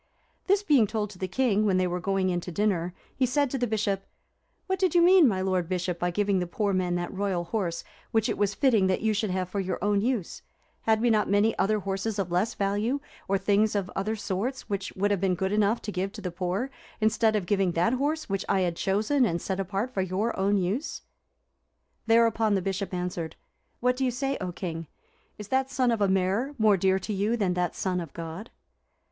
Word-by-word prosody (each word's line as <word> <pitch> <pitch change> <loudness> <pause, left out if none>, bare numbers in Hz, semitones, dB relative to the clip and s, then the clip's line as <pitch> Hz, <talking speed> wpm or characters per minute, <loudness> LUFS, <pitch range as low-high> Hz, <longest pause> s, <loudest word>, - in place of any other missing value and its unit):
This 395 +1 +3
being 280 - +4
told 210 -1 -2
to 185 - -13
the 185 - -2
king, 215 0 +1
when 195 -3 +2
they 185 - +2
were 180 0 -2
going 190 0 0
in 175 0 -1
to 180 - -7
dinner, 180 -2 0 0.2
he 260 - +2
said 285 +1 +1
to 270 - -2
the 245 - +1
Bishop, 205 -3 -1 0.6
"What 380 -1 -1
did 370 -2 +1
you 345 - +6
mean, 360 -3 +7
my 190 -5 0
lord 185 -2 0
Bishop, 180 -1 -2
by 175 - 0
giving 200 +1 +1
the 180 - -2
poor 200 +3 -1
man 180 -1 0
that 175 +1 -3
royal 190 -3 -1
horse, 175 -2 -2 0.3
which 225 -2 +1
it - - -1
was 205 -1 0
fitting 225 -8 +3
that 185 - 0
you 220 0 +2
should 215 0 -1
have 185 0 -1
for 200 +2 -3
your 190 -1 -2
own 205 -1 +2
use? 230 -6 -2 0.4
Had 220 0 +2
not 220 -3 +3
we - - -3
many 205 +2 +3
other 215 +3 +2
horses 195 +3 -2
of 190 -3 -2
less 195 +7 0
value, 205 +7 0 0.3
or 195 - +2
things 205 +2 +2
of 195 -3 -1
other 215 +3 -1
sorts, 215 +6 -3
which 200 -1 -3
would 205 +2 0
have 200 -3 0
been 190 -2 +2
good 190 +2 -1
enough 210 +2 +2
to 210 - -4
give 195 0 -2
to 215 - -8
the 180 -2 -4
poor, 185 +9 -2 0.3
instead 220 0 +2
of 205 -4 0
giving 195 -2 +1
that 175 +9 +2
horse, 295 +5 -1
which 195 -2 -1
I 195 -1 +3
had 175 -2 0
chosen 215 +8 +1
and 170 -7 +1
set 190 +2 -3
apart 195 +6 -2
for 190 - 0
your 190 +5 -1
own 200 +2 +2
use?" 195 - -2 1.0
Thereupon 225 -2 +4
the 190 - +1
Bishop 195 +1 -2
answered, 180 -3 -3 0.5
"What 250 +1 +2
do 265 - -1
you 260 - +2
say, 270 +3 -1
O 180 -1 -3
king? 165 -2 -5 0.5
Is 210 -1 -9
that 265 0 +1
son 255 -2 +1
of 225 -2 -1
a 200 - +4
mare 195 +9 0
more 215 -3 +5
dear 190 0 +2
to 210 +3 -4
you 205 +4 0
than 195 -5 +1
that 180 -1 -1
son 185 -2 -1
of 165 -5 -7
God?" 165 +7 -7
200 Hz, 230 wpm, -27 LUFS, 185-225 Hz, 1.0 s, mean